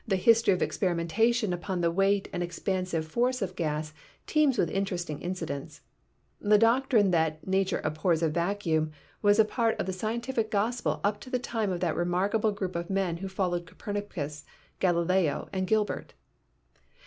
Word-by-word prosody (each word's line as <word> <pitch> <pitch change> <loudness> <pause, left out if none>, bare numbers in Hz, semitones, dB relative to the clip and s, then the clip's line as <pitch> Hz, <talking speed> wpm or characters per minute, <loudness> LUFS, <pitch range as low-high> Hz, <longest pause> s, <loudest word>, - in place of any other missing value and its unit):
The 195 - +2
history 230 +3 +4
of 185 - +2
experimentation 195 +5 +1
upon 175 +1 -3
the 170 -1 +2
weight 195 +2 +2
and 175 - -2
expansive 175 -1 -2
force 250 +9 +1
of 185 -4 -3
gases 155 -2 -2 0.3
teems 300 -5 +3
with 170 - +1
interesting 180 -6 -2
incidents. 165 -6 -5 0.6
The 210 +1 +4
doctrine 230 -2 +4
that 160 -2 0
"nature 190 0 +1
abhors 160 +2 +1
a 160 - +3
vacuum" 165 -2 0 0.3
was 205 0 +4
a 220 - +6
part 230 0 0
of - - 0
the 190 - -2
scientific 225 +3 -2
gospel 220 +4 0
up 205 0 +1
to - - -10
the 255 - +1
time 225 -4 -2
of 175 -1 -3
that 170 -3 0
remarkable 195 +5 +1
group 190 -3 -4
of 170 +1 -3
men 190 -3 0
who 195 +3 -5
followed 180 -3 -2
Copernicus, 165 -7 -5 0.4
Galileo 175 -3 +1
and 185 -1 -1
Gilbert. 215 +1 -1
190 Hz, 160 wpm, -28 LUFS, 170-215 Hz, 0.6 s, a